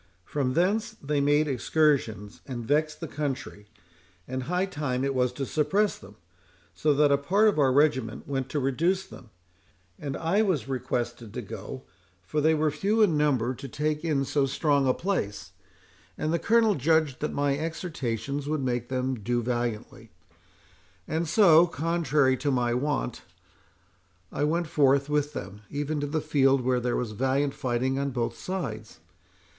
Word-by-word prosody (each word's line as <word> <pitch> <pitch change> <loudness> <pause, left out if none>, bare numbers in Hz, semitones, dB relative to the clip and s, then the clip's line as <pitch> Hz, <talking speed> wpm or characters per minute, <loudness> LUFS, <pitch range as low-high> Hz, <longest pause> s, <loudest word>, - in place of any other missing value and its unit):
From 135 -3 -1
thence 210 +6 +1
they 145 0 -1
made 145 +2 +3
excursions, 130 -6 0
and 120 -4 -5
vexed 155 +5 0
the 165 - -4
country; 135 -8 -5 0.6
and 130 +1 -3
high 180 +8 0
time 145 -8 -2
it 135 0 0
was 125 -1 +1
to 135 +1 -3
suppress 190 +10 +1
them, 100 +2 -14 0.6
so 150 - +1
that 145 0 +4
a 140 - +4
part 195 +9 +3
of 205 -7 +2
our 135 -2 +4
regiment 130 -5 +1
went 135 -1 -2
to 150 - -1
reduce 170 +8 0
them; 120 - -13 0.7
and 140 -2 -4
I 170 +6 +1
was 185 - 0
requested 120 -4 -3
to - - -4
go, - - -8 0.4
for 150 +11 -1
they 160 +2 +4
were 155 0 +1
few 205 +9 +2
in 175 -7 +3
number 130 -5 +1
to 135 - -8
take 150 +3 -2
in 145 -5 +1
so 140 0 +1
strong 140 0 +1
a 130 - +4
place, 100 - -3 0.7
and 155 +1 -1
the 170 - +1
Colonel 225 +1 +3
judged 155 -3 +1
that 150 - -2
my 140 -1 +1
exhortations 140 - -3
would 150 -2 -1
make 120 -1 -2
them 130 -1 -1
do 120 +3 -1
valiantly. 120 -2 -3 1.0
And 160 +2 -1
so, 170 -1 +6
contrary 155 -4 +1
to 145 +3 -1
my 120 -3 +1
wont, 130 -1 -2 1.1
I 145 - 0
went 170 +3 0
forth 140 -2 +2
with 150 0 0
them, 100 -3 -7
even 145 +1 -2
to 145 - -2
the 155 +2 -1
field, 135 -3 +3
where 125 0 +1
there 125 0 -1
was 120 -3 -2
valiant 135 +5 0
fighting 130 +2 -1
on 140 0 -1
both 120 -3 -2
sides. 115 - -5
140 Hz, 165 wpm, -27 LUFS, 125-155 Hz, 1.1 s, so